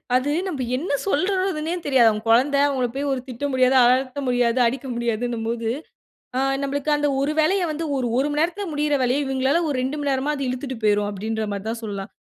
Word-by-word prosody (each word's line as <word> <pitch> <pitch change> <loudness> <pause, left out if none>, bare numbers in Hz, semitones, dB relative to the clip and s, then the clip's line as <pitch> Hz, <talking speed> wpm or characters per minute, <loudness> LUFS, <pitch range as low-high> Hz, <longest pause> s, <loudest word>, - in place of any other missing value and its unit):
அது 255 +3 +2 0.2
நம்ம 280 -8 -3
என்ன 320 +8 -4 0.2
சொல்றதுன்னே 370 -2 0
தெரியாது. 260 -5 +5
அவன் 215 +1 -4
குழந்தை 265 +5 +4
அவுங்கள 265 -3 0
போய் 285 +1 -1 0.2
திட்ட 250 +3 -6
முடியாது. 255 0 +3
அதட்ட 255 +2 +2
முடியாது. 245 -1 +2
அடிக்க 265 +3 -2
முடியாதுன்னும்போது, 235 -1 -2 0.7
ஆ - - +2 0.2
நம்மளுக்கு 280 +1 -2
அந்த 290 0 +1
ஒரு 290 +2 +1
வேலைய 365 +5 +3
வந்து 320 +2 -3
ஒரு, 260 -2 -1
ஒரு 275 +3 +2
மணி 295 - 0
நேரத்தில 360 +5 -1
முடியிற 295 0 0
வேலைய 255 +3 +1
இவுங்களால 265 +3 +1
ஒரு 285 - -1
2 260 +4 -2
மணி 290 -1 -1
நேரமா 270 +3 0
அது 275 -1 -3
இழுத்துட்டு 255 0 -4
போயிரும், 205 -1 +2
அப்பிடீன்றமாரி 210 0 -3
தான் 230 +1 -3
சொல்லலாம். 200 -2 -5
260 Hz, 185 wpm, -23 LUFS, 235-290 Hz, 0.7 s, தெரியாது